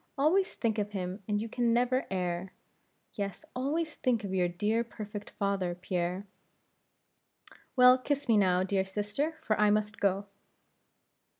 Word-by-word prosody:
always 350 +7 +2
think 225 -2 0
of 205 0 -2
him 185 +1 -4
and 210 -1 +1
you 225 - -3
can 235 0 +1
never 250 +2 +2
err; 180 0 -2 0.6
yes, 200 -3 -4
always 300 +5 -1
think 240 -5 +1
of 195 -2 -4
your 180 -2 +2
dear 210 +6 0
perfect 210 -2 -8
father, 195 -3 0
Pierre." 180 +1 -2 1.5
"Well, 250 0 +7
kiss 285 +2 -2
me 230 - +5
now, 185 -3 +3
dear 190 0 +1
sister, 210 +11 -2
for 215 -2 +1
I 210 0 +5
must 210 +1 0
go." 200 0 +1
210 Hz, 145 wpm, -30 LUFS, 190-245 Hz, 1.5 s, Well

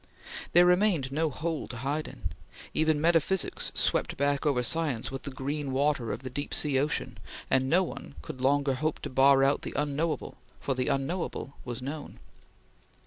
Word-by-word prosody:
There 175 +1 +7
remained 180 -7 +3
no 155 +3 +1
hole 160 +2 -3
to 120 - -7
hide 140 +5 -2
in. 125 -3 -6 0.4
Even 155 -1 +2
metaphysics 170 +3 +2
swept - - +2
back 140 +1 +1
over 125 -4 +2
science 145 -5 0
with 135 -1 -5
the 140 - -6
green 140 +1 -3
water 135 -3 +1
of - - -5
the 130 - -4
deep 145 +3 -4
sea 140 -3 +1
ocean 150 +2 -2 0.3
and 130 0 +3
no 180 +5 +4
one 155 - -7
could 130 - -7
longer 140 +1 +3
hope 155 +4 -1
to - - -5
bar 135 +1 +5
out 140 +1 +3
the - - -6
unknowable, 150 +2 -1 0.2
for 135 - -1
the 130 -1 -1
unknowable 140 0 -2
was 125 0 -5
known. 145 +3 -6
140 Hz, 175 wpm, -29 LUFS, 135-155 Hz, 0.4 s, There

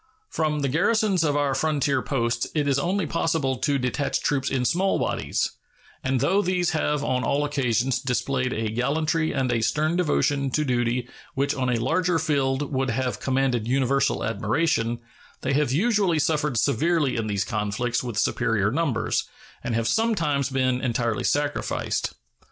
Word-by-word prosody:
From 150 -2 0
the 140 - +1
garrisons 195 - +2
of 145 -2 +1
our 145 -2 +1
frontier 145 0 +1
posts 120 -3 -1
it 150 -2 +1
is 140 -1 +2
only 185 +4 0
possible 155 -4 0
to 140 +3 +1
detach 125 +2 -1
troops 135 -2 0
in 130 -2 0
small 190 +7 +2
bodies; - - -1 0.5
and 130 -1 0
though 200 +1 +3
these 180 -2 0
have 150 -3 0
on 125 0 0
all 145 +5 +1
occasions 130 -3 0
displayed 130 0 -1
a 110 -2 -2
gallantry 155 +7 0
and 130 -3 0
a 115 -1 +1
stern 155 +7 +1
devotion 145 -5 +1
to 150 +4 0
duty 120 -1 0 0.3
which 140 +1 +1
on 130 -2 -1
a 125 - +2
larger 165 +7 +1
field 140 -2 0
would 130 0 0
have 125 +2 -1
commanded 130 -4 0
universal 135 +1 +1
admiration, 115 +1 0 0.4
they - - -1
have 145 -2 +1
usually 195 - +2
suffered 150 -3 0
severely 150 +3 +1
in 115 -2 -2
these 100 -2 -1
conflicts 105 +4 -1
with 120 -4 -5
superior 115 -3 +1
numbers, 130 -7 0 0.4
and 120 - -2
have 115 0 0
sometimes 165 - +1
been 130 -1 0
entirely 120 -3 -1
sacrificed. 145 0 -1
135 Hz, 160 wpm, -25 LUFS, 125-155 Hz, 0.5 s, though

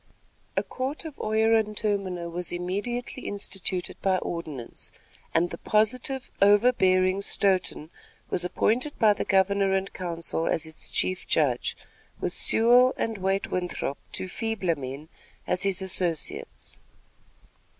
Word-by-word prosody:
A - - +3
court 270 +6 -3
of 310 -3 -8
oyer 220 +1 +2
and 215 -2 +1
terminer 195 -5 -1
was 175 +1 -3
immediately 205 +9 -3
instituted 190 -2 -3
by 190 -1 +2
ordinance, 155 -9 -6 0.4
and 170 +2 +1
the - - -7
positive, 245 +5 0
overbearing 195 -3 +4
Stoughton 185 -5 0 0.4
was 175 - 0
appointed 240 +10 0
by 215 -2 +5
the - - -3
governor 195 0 +3
and 195 0 -1
council 170 -2 -3
as 160 - 0
its 160 0 -5
chief 185 0 -1
judge, - - +1 0.4
with - - -2
Sewall 245 +3 +4
and 225 -2 -2
Wait 195 +1 -1
Winthrop, 180 -6 -2
two - - -3
feebler 200 -4 -1
men, 140 +2 -7 0.4
as 180 - 0
his 195 -1 0
associates. 180 -4 0
195 Hz, 130 wpm, -26 LUFS, 180-220 Hz, 0.4 s, by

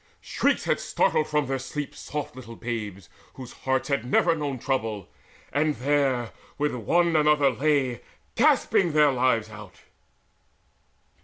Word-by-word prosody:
Shrieks - - 0
had - - 0
startled 155 - +1
from 150 -1 0
their 135 0 -2
sleep 145 +2 -5
Soft 145 -2 -6
little 115 -3 -10
babes 105 -6 -5 0.3
whose 130 -2 -9
hearts 130 0 -1
had 140 -5 0
never 150 +7 +3
known 145 -4 -3
Trouble 110 -6 -3 0.4
and 150 +1 +1
there 135 -3 0 0.3
one 150 +1 0 0.3
with 170 -1 0
another 150 -2 +4
lay 135 -2 0 0.3
Gasping 175 -5 +3
their 150 -1 +5
lives 120 -4 +1
out! 105 -3 -12
135 Hz, 135 wpm, -25 LUFS, 120-150 Hz, 0.4 s, their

